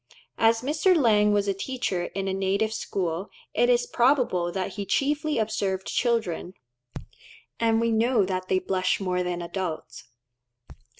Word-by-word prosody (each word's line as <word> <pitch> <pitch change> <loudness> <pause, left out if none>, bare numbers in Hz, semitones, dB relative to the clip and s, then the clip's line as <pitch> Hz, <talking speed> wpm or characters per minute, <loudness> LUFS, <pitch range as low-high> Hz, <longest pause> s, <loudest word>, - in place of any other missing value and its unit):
As 225 0 +4
Mr. 310 +7 +3
Lang 210 -6 +4
was 205 -1 +1
a 200 - +2
teacher 195 -4 -3
in 195 0 -2
a 190 - -1
native 195 +3 0
school, 185 -4 -3 0.2
it 485 - +2
is 485 -1 +3
probable 245 - +2
that 185 0 -3
he 200 - -4
chiefly 295 +9 0
observed 205 -3 -1
children; 220 -7 -1 1.0
and 225 -1 +2
we 230 0 +1
know 225 -1 +2
that 185 -1 -3
they 185 - +2
blush 185 0 0
more 180 -2 -1
than 175 -1 -3
adults. 170 -5 -5
200 Hz, 145 wpm, -26 LUFS, 185-235 Hz, 1.0 s, As